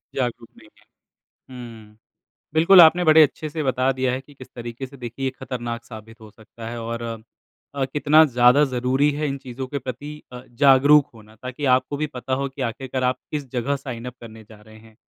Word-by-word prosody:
जागरूक 120 -3 -3
नहीं 110 -1 -18
है, - - -27 1.1
हुँ, 105 - -25 0.6
बिल्कुल 170 +4 +7
आपने 175 +2 +6
बड़े 155 0 +7
अच्छे 155 +1 0
से 155 +1 -4
बता 130 -1 +1
दिया 130 -1 -1
है 130 - -3
कि 145 +2 -19
किस 130 - -13
तरीके 120 +2 -7
से, 140 +2 -15
देखिए, 120 +2 -7
ये 130 - 0
ख़तरनाक 120 -1 -5
साबित 110 0 -12
हो 110 -1 -13
सकता 115 +1 -12
है 120 0 -6
और 115 +1 -5 0.7
अ, 135 -1 -1
कितना 150 +3 +4
ज़्यादा 125 +1 +4
ज़रूरी 130 +4 +1
है 150 +1 -2
इन 140 - -3
चीज़ों 130 0 -7
के 140 +2 -4
प्रति 130 +3 -7 0.2
अ, 125 - -8 0.2
जागरूक 140 +2 +6
होना, 110 -1 -17
ताकि 130 +3 -6
आपको 130 +3 -4
भी 155 +1 -2
पता 125 +2 -5
हो 140 - -2
कि 135 0 -7
आख़िरकार 130 +2 -4
आप 125 0 +1
किस 145 -3 -4
जगह 135 +3 -1
साइन 125 -4 -8
अप 125 - -7
करने 110 -1 -12
जा 105 -1 -15
रहे 110 +1 -16
हैं, 110 0 -19
130 Hz, 205 wpm, -22 LUFS, 115-140 Hz, 1.1 s, बिल्कुल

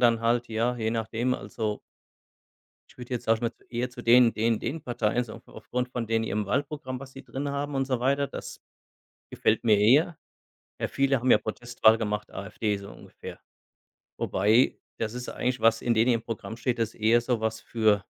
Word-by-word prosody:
dann 115 -2 +4
halt, 120 +1 +1
ja, 115 +2 0
je 110 -1 -1
nachdem, 115 +2 -1
also 105 -1 -4 1.1
ich - - -22
würde 125 +1 -5
jetzt, 120 - -4
sage 115 - +3
ich 110 - -12
mal, 115 - 0
zu - - -29
eher 125 +1 -2
zu 120 0 -10
den 120 0 +6
den 115 0 +1
den 160 +2 -4
Parteien 120 -2 0
so 110 - -10
auf - - -14
aufgrund 125 +3 -4
von 120 -3 -3
denen 115 0 +1
ihrem 105 -2 -2
Wahlprogramm, 140 +2 -2
was 135 -1 -10
sie 135 - -11
drin 140 +2 -4
haben 140 0 -3
und 135 0 0
so 130 -2 -1
weiter, 140 +2 +2
das - - -8 0.7
gefällt - - +1
mir 105 -3 +5
eher. 145 +10 +4 0.6
Ja, - - 0
viele 135 0 +2
haben 130 0 +1
ja - - +7
Protestwahl 110 0 +2
gemacht, 105 -1 -3
AfD 100 +2 -2
so 100 0 -9
ungefähr. - - -11 0.8
Wobei 110 +6 +3 0.2
das 110 0 -3
ist 125 0 -6
eigentlich 125 -1 -2
was, 115 0 +4
in 120 - +2
denen 115 +3 +4
ihrem 115 - 0
Programm 115 0 -6
steht, 125 0 -1
das 115 -1 -1
eher 115 +2 +3
so 120 -2 0
was 110 0 -2
für 110 -3 +1
115 Hz, 200 wpm, -27 LUFS, 110-125 Hz, 1.1 s, ja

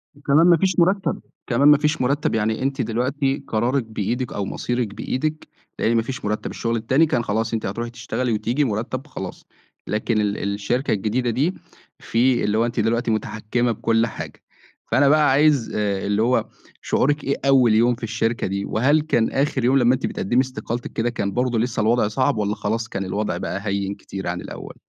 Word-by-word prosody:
وكمان 145 +3 +3
ما 170 -2 +6
فيش 185 +1 +1
مُرتَّب، 190 +3 +2 0.3
كمان 135 +4 +3
ما 150 -1 +8
فيش 150 -1 0
مُرتَّب. 140 -1 +1
يعني 110 0 0
أنتِ 135 0 -1
دلوقتي 135 +4 -1
قرارِك 120 +4 0
بإيدِك 115 +3 -3
أو 100 - -2
مصيرِك 120 -2 -2
بإيدِك، 155 +8 -3 0.3
لإن 115 +1 +2
ما 115 - +3
فيش 130 +1 -6
مُرتَّب، 105 +1 -2
الشغل 115 0 -2
التاني 130 +8 +3
كان 125 -6 0
خلاص 110 +2 -1
أنتِ 110 - -2
هتروحي 115 +5 -3
تشتغلي 120 +1 -2
وتيجي 120 +7 0
مُرتَّب 125 +4 -3
خلاص، 95 -8 -7 0.4
لكن 110 0 0
ال 105 0 -1 0.2
الشركة 120 +7 -1
الجديدة 115 +4 0
دي 150 +10 +1 0.5
في 120 +2 +1
اللي 105 +1 +1
هو 115 - +3
أنتِ 120 - -3
دلوقتي 115 +1 +1
متحكِّمة 110 +2 -1
بكل 115 +1 +1
حاجة، - - -8 0.5
فأنا 140 +1 +4
بقى 150 -1 +4
عايز 145 -3 +3
آآ 100 -2 -1
اللي 105 +1 +1
هو 125 +3 +2 0.4
شعورِك 145 +2 +1
إيه 140 - 0
أول 130 -5 +5
يوم 120 +2 +4
في 120 - -16
الشركة 115 +2 -1
دي؟ 100 +1 -2
وهل 140 +8 +2
كان 120 -7 +1
آخِر 135 -2 0
يوم 130 +2 +4
لمّا 125 -1 +4
أنتِ 130 - -3
بتقدّمي 120 +7 +1
استقالتِك 120 -2 -5
كده، 115 +2 0
كان 100 -4 -2
برضه 125 -2 0
لسّه 115 -2 -1
الوضع 110 0 +2
صعب 130 +3 0
والّا 105 0 0
خلاص 110 +2 -2
كان 100 -2 -4
الوضع 100 -1 -2
بقى 100 +3 -4
هيِّن 100 0 -1
كتير 95 -1 -7
عن 90 0 -3
الأول؟ - - -9
120 Hz, 190 wpm, -22 LUFS, 110-135 Hz, 0.5 s, ما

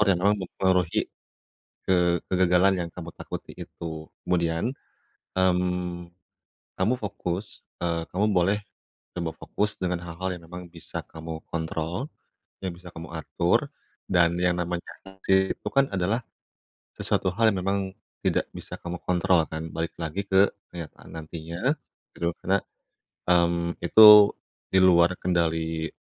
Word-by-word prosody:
orang-orang 100 -1 +4
yang - - -5
mempengaruhi 90 -3 +1 0.9
ke 95 - +4 0.3
kegagalan 95 +1 +4
yang 85 -1 -4
kamu 85 -2 -7
takuti - - -7
itu. 80 -2 -7 0.2
Kemudian, 85 +6 +1 0.7
mmm, 90 -1 0 0.7
kamu 100 +6 +3
fokus 100 -1 -4 0.2
eee, 85 -1 0
kamu 100 +4 +1
boleh 95 +3 +3 0.6
coba 85 -2 -2
fokus 105 0 -2
dengan 90 -1 0
hal-hal 90 +2 -4
yang 85 - -16
memang 90 +1 -8
bisa 85 -2 -6
kamu 80 0 -7
kontrol, 85 - -3 0.5
yang 95 -2 -2
bisa 90 +1 -12
kamu 80 -1 -8
atur. 80 - +1 0.4
Dan 85 -2 +3
yang 90 -1 +3
namanya 85 0 -2 0.2
hasil 95 0 +1
itu - - -9
kan 135 0 +4
adalah 100 +5 +1 0.8
sesuatu 95 - 0
hal 115 0 +4
yang 95 - -2
memang 100 +1 +1 0.5
tidak - - +1
bisa - - -6
kamu 85 0 -5
kontrol, 90 -1 +3
kan? 80 0 -4
Balik 80 0 -3
lagi 85 +5 -2
ke 95 +1 +5 0.2
kenyataan 85 -3 -9
nantinya, 85 - -2 0.4
gitu. 85 0 0
Karena, 95 +1 +2 0.7
mmm, 85 -1 +2
itu 105 +2 +10 0.4
di 95 - +6
luar 85 -1 +6
kendali 80 -2 0
90 Hz, 130 wpm, -26 LUFS, 85-95 Hz, 0.9 s, itu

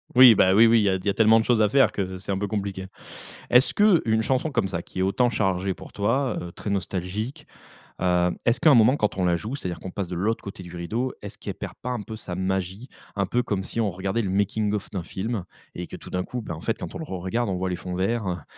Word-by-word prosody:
Oui, 125 -2 +10
bah 95 0 +4
oui, 115 +2 +8
oui, 115 0 +5
il - - +2
y 100 - +3
a 95 - +1
t 90 - -11
il - - -15
y - - +2
a - - +2
tellement 110 0 +5
de 110 - -1
choses 120 -3 +3
à 105 - +4
faire 135 +3 +4
que 95 -2 -3
c'est 95 +2 -5
un 95 - 0
peu 105 - -1
compliqué. 100 -2 -4 0.6
Est-ce 125 +1 +5
que 205 -5 +5
une 110 0 +2
chanson 135 +6 0
comme 95 - +1
ça 85 -2 -3
qui 95 - -9
est - - +2
autant 120 +6 +2
chargée 95 -3 0
pour - - -13
toi, 125 +6 0
heu, 85 -1 -7
très 100 - -7
nostalgique, 100 - -3 0.5
heu, 90 -1 +2
est-ce 120 0 +2
qu'à 160 - +5
un - - +7
moment 120 +5 +5
quand 105 -2 -1
on 90 - 0
la 85 -1 +2
joue, 110 +9 -5
c'est-à-dire 90 -10 -5
qu'on 95 - -7
passe 95 -4 -4
de 90 - -4
l'autre 110 +5 -1
côté 95 -2 -8
du 90 0 -10
rideau, 115 +9 -2
est-ce - - -8
qu'elle - - -5
perd - - -7
pas 125 - -3
un 120 -4 -3
peu 110 +1 -8
sa 90 -4 -6
magie, 95 +5 -3 0.3
un 100 -1 +1
peu 120 +5 0
comme 100 -5 -2
si 115 - -5
on 105 -3 +2
regardait 95 +5 -2
le 95 - -2
making-of 100 +1 0
d'un 95 -4 -4
film 100 +1 -4 0.3
et 90 0 -5
que - - -8
tout - - -11
d'un 90 0 -2
coup, 125 -1 -5
ben 85 -6 -6
en 80 - -10
fait, 115 - -1
quand - - -7
on - - -3
le 160 - -6
re-regarde 95 +5 -2
on 95 - -1
voit 95 +1 -2
les 90 - -1
fonds 90 -1 -6
verts, 95 -3 -1
100 Hz, 285 wpm, -25 LUFS, 95-115 Hz, 0.6 s, Oui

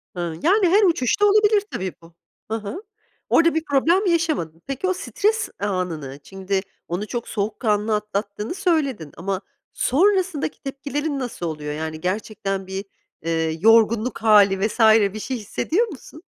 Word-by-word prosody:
Hıı, 170 -2 -4
yani 380 +4 +4
her 405 +4 +5
uçuşta 345 - +2
olabilir 420 0 +4
tabii, 185 -1 -3
bu. 165 0 -17 0.4
Hı - - +1
hı. 220 - -7 0.5
Orada 335 -1 +4
bir 320 - 0
problem 330 +8 +2
yaşamadın. 315 - 0
Peki, 275 +7 -2
o 375 - +2
stres 425 +4 -1
anını, 175 -9 -3
şimdi 195 +2 -2 0.3
onu; 180 +5 -3
çok 235 +2 -4
soğukkanlı 210 0 0
atlattığını 210 - -3
söyledin 290 - 0
ama 190 +2 -3 0.3
sonrasındaki 365 0 +1
tepkilerin 280 +1 -3
nasıl 245 -8 -4
oluyor? 150 -2 -4
Yani, 155 +1 -5
gerçekten 195 0 -3
bir, 190 +1 -5 0.4
eee, 160 -1 -1
yorgunluk 225 +3 +4
hâli 200 -2 +5
vs. 220 - -9 0.3
bir 215 - -5
şey 255 +4 -3
hissediyor 320 - -1
musun? 310 - -12
220 Hz, 145 wpm, -22 LUFS, -, 0.5 s, her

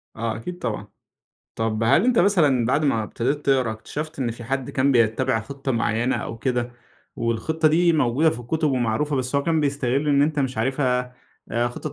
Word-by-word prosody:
آه، 115 0 -2
أكيد 175 +10 -7
طبعًا. - - -4 0.7
طب 115 0 -1
هل 140 - +4
أنتَ 250 -2 +3
مثلًا 155 - +3
بعد 145 +5 +1
ما 115 -6 +1
ابتديت 135 +7 -2
تقرا، 130 -4 +2
اكتشفت 145 +8 -6
إن 120 -3 -1
في 120 +1 -9
حد 135 +1 -3
كان 140 +1 +2
بيتّبع 115 0 +2
خطّة 135 +3 -4
معيّنة 115 +1 0
أو 115 - -5
كده، 125 0 -1 0.4
والخطّة 155 +8 0
دي 170 +2 +3
موجودة 150 +2 +3
في 120 - -5
الكتب 150 +5 -1
ومعروفة، 130 +4 0
بس 130 +1 -2
هو 140 - +1
كان 165 -2 +1
بيستغلّ 140 0 0
إن 140 -1 +4
أنتَ 150 0 +1
مش 130 -4 -1
عارفها، 125 0 0 0.4
آآ، 120 +2 +1
خطة 140 +5 -6
130 Hz, 185 wpm, -23 LUFS, 115-150 Hz, 0.7 s, هل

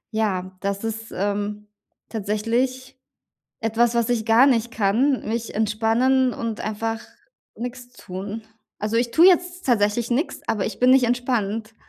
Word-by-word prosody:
Ja, 185 -4 -1
das 200 +1 -2
ist, 225 0 -5
ähm, 205 +1 -3 0.4
tatsächlich 240 +5 -2 0.6
etwas, 225 +1 +1
was 235 0 +1
ich 225 -2 0
gar 225 +4 +6
nicht 240 -3 +2
kann, 230 +7 +1
mich 230 +1 -3
entspannen 225 +4 +2
und 230 -2 -4
einfach 225 +1 -3 0.5
nix 245 +1 -7
tun. 200 0 -7 0.4
Also, 215 +2 -1
ich 235 -1 -1
tue 335 +3 +7
jetzt 360 0 +3
tatsächlich 230 -1 +1
nix, 280 +8 -1
aber 210 -3 0
ich - - -5
bin 250 +1 +4
nicht 260 -1 +6
entspannt. 225 -3 -1
225 Hz, 140 wpm, -23 LUFS, 210-245 Hz, 0.6 s, tue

